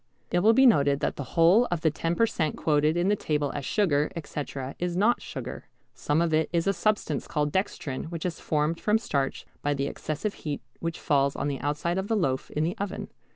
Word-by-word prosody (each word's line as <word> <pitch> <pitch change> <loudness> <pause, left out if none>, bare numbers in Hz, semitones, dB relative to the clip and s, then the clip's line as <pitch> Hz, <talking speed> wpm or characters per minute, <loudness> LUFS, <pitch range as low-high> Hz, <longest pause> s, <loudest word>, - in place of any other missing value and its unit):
It 175 - +3
will 215 +5 +5
be 265 +3 +6
noted 140 - +4
that - - 0
the 145 - -4
whole 180 +9 +6
of 175 -3 -1
the 160 - +3
10 165 +3 -1
per 230 - +4
cent. 155 -8 -2
quoted 150 +1 +2
in 175 +2 +2
the 205 - +3
table 150 -6 -1
as 145 - -4
sugar, 150 -8 +2
etc., 140 -4 -5
is 175 0 -1
not 225 +5 +3
sugar. - - -7 0.3
Some 150 +3 +1
of 165 -2 0
it 155 0 +2
is 170 -1 +1
a 195 - +2
substance 205 -9 0
called 150 -1 0
dextrin 155 -8 -2
which 165 +1 -5
is 175 -2 -3
formed 155 +2 0
from 210 +1 +3
starch 140 -11 -2 0.2
by 145 0 0
the 140 0 -1
excessive 155 +8 -3
heat 150 -2 -5 0.2
which 165 0 -3
falls 140 -2 +2
on 145 - -1
the 135 -2 -3
outside 150 +5 -1
of 190 - -3
the 225 - +1
loaf 130 -9 0
in 150 - -1
the 170 +5 -1
oven. 200 -1 -4
160 Hz, 225 wpm, -27 LUFS, 145-185 Hz, 0.3 s, be